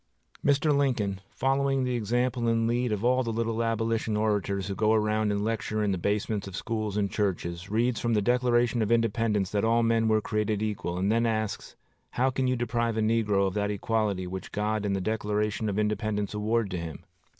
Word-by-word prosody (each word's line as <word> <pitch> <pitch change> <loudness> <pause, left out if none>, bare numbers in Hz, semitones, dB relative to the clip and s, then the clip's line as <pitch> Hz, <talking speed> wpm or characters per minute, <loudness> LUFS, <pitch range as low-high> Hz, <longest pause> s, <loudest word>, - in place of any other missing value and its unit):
Mr. 145 +1 +3
Lincoln, 110 -9 0
following 135 0 +1
the 125 -1 -1
example 120 +2 0
and 115 0 +2
lead 120 0 0
of 105 +1 -1
all 130 +1 +3
the 115 -2 -2
little 115 0 -1
Abolition 115 -1 0
orators 100 -2 0
who 100 - -3
go 110 +3 +2
around 110 -1 +1
and 100 0 -1
lecture 110 -1 -1
in 105 - +1
the 95 - 0
basements 100 +1 -1
of 95 - -7
schools 110 -3 -3
and 100 -2 0
churches, 90 -3 -2
reads 115 +2 +1
from 115 0 0
the 105 - +3
Declaration 120 0 +2
of 110 +1 0
Independence 115 -4 +1
that 105 -1 0
all 115 +1 +3
men 115 0 +2
were 110 0 +3
created 105 0 -1
equal, 100 -5 -3
and 95 +3 +1
then 115 +1 +2
asks, 110 -2 -3 0.3
How 130 +2 +1
can 130 0 0
you 130 - +2
deprive 115 -1 -1
a - - +1
negro 110 -3 +2
of 95 - -1
that 105 0 0
equality 105 -2 -1
which 95 +1 -6
God 105 0 -1
and 100 - 0
the 95 - -2
Declaration 105 +1 -1
of 100 - -2
Independence 105 -1 -1
award 105 0 0
to 90 - -2
him? 80 -3 -7
110 Hz, 205 wpm, -28 LUFS, 105-115 Hz, 0.3 s, Mr